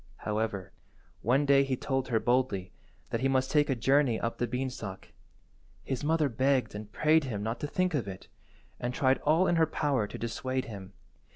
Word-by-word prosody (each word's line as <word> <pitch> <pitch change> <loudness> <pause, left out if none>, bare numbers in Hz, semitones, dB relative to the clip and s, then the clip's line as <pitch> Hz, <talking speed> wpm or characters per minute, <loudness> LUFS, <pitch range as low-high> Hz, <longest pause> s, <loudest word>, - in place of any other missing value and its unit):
However, 105 -3 -2 0.5
one 130 +6 +2
day 140 -1 +5
he 135 -1 -1
told 135 0 -1
her 115 -3 +1
boldly 120 -7 0 0.4
that 115 - 0
he 135 - +3
must 130 -1 +1
take 150 0 +3
a 135 - +2
journey 135 -1 +3
up 115 - -3
the 120 - 0
beanstalk. 125 -6 -5 0.7
His 130 -1 -3
mother 155 0 +2
begged 130 +1 +1
and 105 0 -8
prayed 155 +4 +3
him 105 -6 -3
not 115 +2 -3
to 150 - -3
think 185 +3 0
of 125 -9 -1
it, 95 -2 -8 0.5
and 125 0 -3
tried 130 -1 +3
all 160 +5 +3
in 175 - +2
her 160 -1 +4
power 140 -8 0
to - - -8
dissuade 130 +2 -2
him. 100 -3 -9
130 Hz, 190 wpm, -30 LUFS, 110-140 Hz, 0.7 s, day